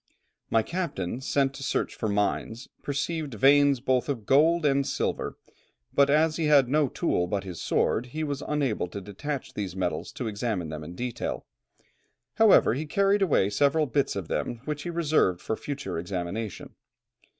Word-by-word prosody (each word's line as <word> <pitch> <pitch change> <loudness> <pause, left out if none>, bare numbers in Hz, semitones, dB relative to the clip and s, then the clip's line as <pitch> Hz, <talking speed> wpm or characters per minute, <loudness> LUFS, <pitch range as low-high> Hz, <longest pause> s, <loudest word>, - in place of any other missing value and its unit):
My 115 -1 +3
captain, 140 - -3
sent 135 0 +1
to 135 - -8
search - - -1
for 110 - -3
mines, 105 +4 -1
perceived 145 -1 -3
veins 140 +2 +5
both 130 +1 0
of 120 -7 -3
gold 160 +6 +4
and 140 -1 +3
silver; - - -2 0.6
but 140 0 +4
as 155 +2 +3
he 165 - 0
had 145 -4 +5
no 150 +2 +2
tool 90 - 0
but 100 +1 -2
his 90 -4 -7
sword, 125 - +1
he 155 +5 -4
was 145 -2 -3
unable 140 -11 0
to 100 - -7
detach 115 +9 -5
these 95 -4 -4
metals 95 - -2
to - - -5
examine 105 -5 -2
them 75 0 -6
in 85 +3 -9
detail; 125 +3 -4 0.9
however, 220 - +6
he 150 +5 -3
carried 200 +4 +2
away 140 - +3
several 145 +8 +3
bits 135 -2 0
of 95 -4 -4
them 120 -1 -3
which 150 -1 -3
he 175 - -5
reserved 155 - +2
for 110 - -3
future 120 - -5
examination. 90 +4 -5
135 Hz, 170 wpm, -27 LUFS, 105-150 Hz, 0.9 s, however